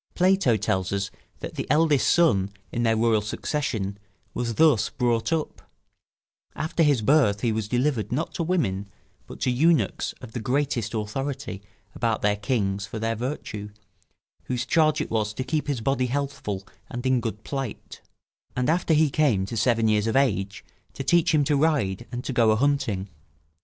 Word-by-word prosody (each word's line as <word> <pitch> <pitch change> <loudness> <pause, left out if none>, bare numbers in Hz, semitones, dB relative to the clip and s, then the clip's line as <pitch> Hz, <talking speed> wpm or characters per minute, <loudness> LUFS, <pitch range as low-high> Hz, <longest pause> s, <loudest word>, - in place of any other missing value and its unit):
Plato 185 - +3
tells 95 -2 -1
us 100 0 -2 0.3
that - - -6
the - - -5
eldest 150 -2 +3
son 100 - +3 0.2
in 120 - -2
their 115 -1 +2
royal 110 -1 +3
succession 105 -3 -3 0.3
was 115 -2 -2
thus 140 -8 +4
brought 115 -2 0
up; 160 -2 -3 0.9
after 160 +2 -1
his 145 -8 +3
birth 110 -5 +3
he 120 - +1
was 110 -1 -2
delivered, 125 0 0
not 150 +7 -2
to - - -3
women, 110 - -1 0.4
but - - -10
to 130 - +2
eunuchs 160 +6 +2
of 125 -3 -12
the 120 - -4
greatest 125 -2 -1
authority 135 +1 -4 0.3
about - - -1
their 105 0 +3
kings 100 -3 -1
for 110 - -6
their 115 +1 -1
virtue, 110 -4 -5 0.8
whose 125 0 -2
charge 155 +2 +3
it - - -5
was 110 -1 -1
to 130 - -2
keep 155 +2 -2
his 140 -5 -1
body 130 +1 +1
healthful 125 -8 -3 0.2
and 120 +1 -6
in 130 -2 +2
good 110 -2 -5
plight; 135 -6 -6 0.5
and 125 +4 +1
after 170 -1 +2
he 150 -2 +3
came 130 -12 +2
to 115 - -6
seven 115 0 +2
years 105 0 +2
of 115 - 0
age, 100 -7 0 0.3
to 135 - -5
teach 170 +3 +3
him 150 -2 +3
to 145 +1 +1
ride 135 - +1
and 125 +1 -4
to 135 - -3
go 115 -2 +4
a 110 - +4
hunting. 115 -7 0
120 Hz, 175 wpm, -25 LUFS, 105-145 Hz, 0.9 s, thus